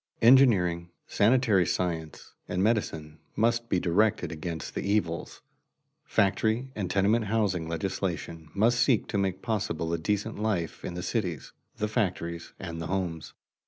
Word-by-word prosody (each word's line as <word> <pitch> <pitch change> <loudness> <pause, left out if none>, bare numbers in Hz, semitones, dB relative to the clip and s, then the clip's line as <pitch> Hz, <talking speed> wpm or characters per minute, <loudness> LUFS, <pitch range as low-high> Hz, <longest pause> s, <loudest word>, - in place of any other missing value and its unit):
Engineering, 95 -10 +5 0.2
sanitary 110 -4 +3
science, 80 -4 -3
and 90 +1 -1
medicine 80 -9 -1 0.2
must 115 +2 +1
be 90 - +2
directed 100 +5 +1
against 80 -1 -5
the - - -3
evils; 100 -5 -1 0.6
factory 110 +6 +1
and 100 -4 -3
tenement 105 +4 +2
house 105 -2 +1
legislation 85 -1 -3
must 115 +4 +3
seek 120 -2 +3
to 100 - 0
make 95 -1 -1
possible 100 -7 -2
a 85 - 0
decent 105 +5 -2
life 100 -7 -2
in 85 - -5
the 90 - -4
cities, 90 - -3 0.2
the 105 - -1
factories, 90 -6 -2
and 85 -1 -6
the 80 - -4
homes. 90 -4 -3
95 Hz, 140 wpm, -28 LUFS, 85-110 Hz, 0.6 s, Engineering